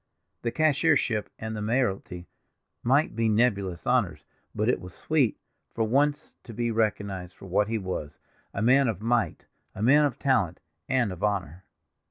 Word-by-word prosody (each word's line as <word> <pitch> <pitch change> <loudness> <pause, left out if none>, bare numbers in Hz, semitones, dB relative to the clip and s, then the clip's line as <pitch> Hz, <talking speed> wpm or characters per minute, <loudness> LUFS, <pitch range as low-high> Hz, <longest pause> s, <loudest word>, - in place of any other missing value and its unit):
The 120 - -1
cashiership 145 -6 +2
and 110 0 -5
the 105 - -4
mayoralty 105 -6 -1 0.5
might 135 +4 +2
be 115 0 +1
nebulous 100 -6 +1
honors, - - +1 0.3
but 105 - 0
it 125 - +1
was 90 0 -10
sweet, 145 -8 +1 0.4
for 115 - +1
once, 145 +6 +1
to 115 - -10
be 120 0 0
recognized 100 -5 -1
for - - -12
what 100 +2 +1
he 115 +1 -1
was—a 95 +1 -6
man 135 +3 +5
of 110 -6 -2
might; 115 +2 0 0.3
a 105 - -4
man 145 +5 +6
of 140 -5 -2
talent, 110 - +1 0.3
and 125 -6 +2
of 90 +2 -7
honor. 95 -4 -2
110 Hz, 160 wpm, -27 LUFS, 100-125 Hz, 0.5 s, man